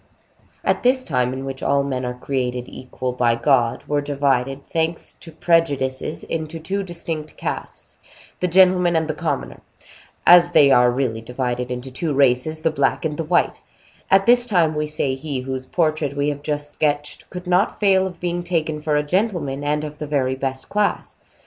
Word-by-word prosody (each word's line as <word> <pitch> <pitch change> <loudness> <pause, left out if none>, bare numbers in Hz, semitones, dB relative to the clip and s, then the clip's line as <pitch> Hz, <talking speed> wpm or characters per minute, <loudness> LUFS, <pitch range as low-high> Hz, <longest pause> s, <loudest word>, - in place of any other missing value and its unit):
At - - +1
this 255 +1 +2
time, 125 - 0
in 130 +1 -5
which 135 -1 -6
men, 140 -2 0
all 125 - -3
created 125 -1 -3
equal 130 0 -5
by 120 -2 +2
God, 120 -1 +1
were 145 0 0
divided, 135 -1 -1
thanks 165 0 -2
to 165 - -13
prejudices, 150 -4 0
into 160 0 -4
two 190 +5 -3
distinct 165 -4 -5
castes, - - -6 0.4
the 180 - +1
gentlemen 180 -1 +4
and 160 -1 +1
the 155 - -1
commoner, 150 - -4 0.6
as 175 0 +7
they 140 -2 +6
are 125 -1 +6
really 120 -3 -1
divided 125 +1 -3
into 125 +1 -5
two 145 +3 -2
races, 140 +3 +2
the 160 - +1
black 155 - 0
and 150 -2 -2
the 165 - -2
white,—at 180 +3 -1
this 245 0 +6
time, 175 -8 +2
we 150 0 -2
say, 150 -3 -1
he 135 0 -4
whose 130 0 -5
portrait 155 -4 0
we 145 +1 +1
have 145 -1 -4
just 145 0 -3
sketched 145 -1 -2
could 180 0 -8
not 180 +3 +1
fail 190 -2 +3
of 180 -2 -10
being 175 0 -2
taken 160 -3 -2
for 150 -1 0
a 150 - +2
gentleman, 155 -5 -1
and 150 +1 0
of 150 0 -7
the 140 -3 -1
best 130 -1 -3
class. 210 0 -1
150 Hz, 175 wpm, -21 LUFS, 130-170 Hz, 0.6 s, as